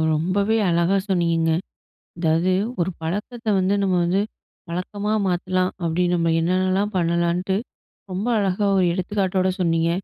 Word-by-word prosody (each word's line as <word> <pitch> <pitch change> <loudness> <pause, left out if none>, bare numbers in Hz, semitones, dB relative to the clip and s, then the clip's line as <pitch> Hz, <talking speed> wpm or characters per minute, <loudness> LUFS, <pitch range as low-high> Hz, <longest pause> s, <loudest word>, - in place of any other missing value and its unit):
ரொம்பவே 200 +7 +1
அழகா 170 +3 +2
சொன்னீங்கங்க. 165 -3 +2 0.6
அதாவது, 170 +1 +1 0.3
ஒரு 170 +2 +1
பழக்கத்தை 210 +7 -3
வந்து 190 +1 +2
நம்ம 190 -2 +1
வந்து 180 +3 +1 0.5
வழக்கமா 200 +4 -3
மாத்தலாம். 185 0 0
அப்படி 170 +1 0
நம்ம 165 -1 +1
என்னன்னலாம் 185 +4 +1
பண்ணலான்ட்டு, 170 +2 +1 0.6
ரொம்ப 190 +4 -3
அழகா 200 0 0
ஒரு 185 - +3
எடுத்துக்காட்டோட 190 0 0
சொன்னீங்க. 165 -1 +2
185 Hz, 120 wpm, -22 LUFS, 170-195 Hz, 0.6 s, ஒரு